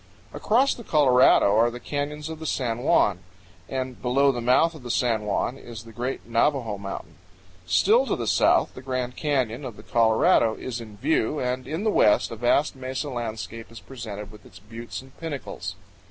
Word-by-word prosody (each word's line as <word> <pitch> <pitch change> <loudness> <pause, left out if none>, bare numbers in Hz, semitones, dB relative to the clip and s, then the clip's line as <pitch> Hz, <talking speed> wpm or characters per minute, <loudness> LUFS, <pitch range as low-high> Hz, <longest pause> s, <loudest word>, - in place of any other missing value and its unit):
Across 255 +6 +2
the 235 - -10
Colorado 130 - +5
are 115 +1 +4
the 120 +1 -8
canyons 150 +2 -4
of 160 -1 -7
the 160 - -5
San 120 -5 -1
Juan, 120 - +3 0.5
and 130 -2 -4
below 135 +3 +3
the 120 -2 -4
mouth 130 +8 +3
of 155 - -11
the 125 - -8
San 115 -3 +1
Juan 120 +6 -1
is 115 -2 -9
the 115 - -13
great 120 -3 -4
Navajo 115 -2 0
Mountain. 100 -1 -7 0.5
Still 475 +4 +4
to - - 0
the - - -4
south - - +3
the - - -10
Grand 130 -1 -3
Canyon 135 -4 -1
of 120 -6 -7
the 105 - -12
Colorado 110 -1 +3
is 120 -2 -5
in 110 -3 -11
view, 145 +2 0
and 125 0 -2
in 160 +6 -3
the 220 - +2
west 105 - +3
a - - -4
vast 120 +6 +1
mesa 130 +2 -4
landscape 115 -1 -6
is 115 - -10
presented 105 -2 -8
with 105 - -15
its 90 - -15
buttes 115 +5 -8
and 135 0 -18
pinnacles. 155 -5 -6
125 Hz, 190 wpm, -25 LUFS, 115-140 Hz, 0.5 s, Colorado